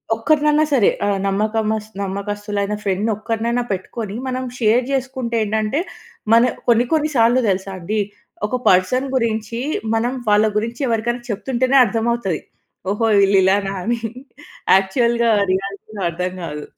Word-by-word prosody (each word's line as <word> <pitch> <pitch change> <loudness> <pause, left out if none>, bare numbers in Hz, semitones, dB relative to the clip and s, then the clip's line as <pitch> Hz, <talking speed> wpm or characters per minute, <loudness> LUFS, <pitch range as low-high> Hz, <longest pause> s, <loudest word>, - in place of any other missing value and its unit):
ఒక్కరినన్నా 300 +5 +3
సరే 235 -7 +5 0.2
ఆహ్, 200 -1 0
నమ్మకమస్ 215 +1 -1
నమ్మకస్తులైన 205 +1 -3
ఫ్రెండ్‌ని 200 +3 0
ఒక్కరినైనా 230 +2 -1
పెట్టుకొని 200 +2 -4
మనం 255 0 -2
షేర్ 230 +2 +3
చేసుకుంటే 260 -3 -2
ఏంటంటే 215 +8 0 0.5
మన 230 - +7 0.3
కొన్ని, 235 +1 +4
కొన్ని 310 -1 +2
సార్లు 235 +3 +4
తెలుసా 190 +1 -2
అండి, 210 +5 -2 0.5
ఒక 250 - -2
పర్సన్ 190 +9 +3
గురించి 230 -1 -1 0.4
మనం 240 +3 0 0.2
వాళ్ళ 210 +1 +5
గురించి 230 +5 -3
ఎవరికైనా 235 +1 -1
చెప్తుంటేనే 255 +5 +1
అర్థమవుతది. 225 -5 -1 0.5
ఓహో! 210 +3 +1
వీళ్ళు 195 0 +4
ఇలానా 195 +1 +2
అని. 235 +2 -1 0.8
యాక్చువల్‌గా 235 +4 +2 0.2
రియాలిటీలో 200 +2 -4
అర్థం 180 +2 -3
కాదు. 150 -2 -5
220 Hz, 125 wpm, -20 LUFS, 200-240 Hz, 0.8 s, మన